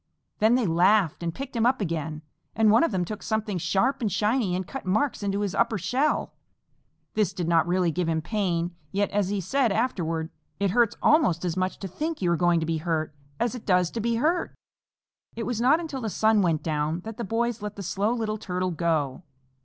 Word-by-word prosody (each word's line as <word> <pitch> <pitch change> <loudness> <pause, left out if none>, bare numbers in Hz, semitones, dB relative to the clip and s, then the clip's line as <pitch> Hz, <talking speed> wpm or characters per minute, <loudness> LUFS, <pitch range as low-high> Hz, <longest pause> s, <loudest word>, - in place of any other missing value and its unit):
Then 220 +3 +4
they 250 -3 +2
laughed 180 0 +3
and 170 -1 -1
picked 270 +8 -7
him 230 0 +3
up 260 +1 +2
again, 160 -5 -3 0.3
and 220 -1 +4
one 225 - +5
of 330 - +2
them 185 -3 0
took 210 +3 -6
something 215 -3 -2
sharp 200 - +1
and 215 -4 0
shiny 210 -1 +1
and 185 +1 -2
cut 270 - -7
marks 215 +10 0
into 200 0 -1
his 200 -3 -1
upper 235 -2 +1
shell. 255 - 0 0.8
This 210 -3 +1
did 180 -3 -3
not 165 -1 +3
really 180 -1 +2
give 175 +1 -1
him 160 -1 +1
pain, 175 -2 -1 0.2
yet, 200 +1 0
as 200 -2 0
he 205 0 -1
said 240 +6 +1
afterward, 170 -8 -1 0.3
"It 200 -2 +1
hurts 235 +1 +2
almost 185 - +3
as 170 -2 -1
much 185 0 -1
to 195 - -3
think 310 - -4
you 180 -3 +1
are - - +3
going 175 0 +3
to 160 - -2
be 165 0 -1
hurt, 160 -1 -2 0.3
as 240 0 0
it 245 - -7
does 180 -3 +3
to 230 - -4
be 235 +1 0
hurt." 320 +9 0 0.8
It 230 - -3
was 240 -2 -2
not 275 +7 +5
until 305 -6 -5
the 225 - -2
sun 220 +1 +3
went 165 -5 +1
down 155 +1 -1
that 220 +2 -8
the 235 - -3
boys 230 +2 -1
let 210 0 -5
the 200 - -6
Slow 200 +4 0
Little 220 -3 -2
Turtle 185 -2 -2
go. 160 -4 -1
200 Hz, 220 wpm, -26 LUFS, 170-230 Hz, 0.8 s, one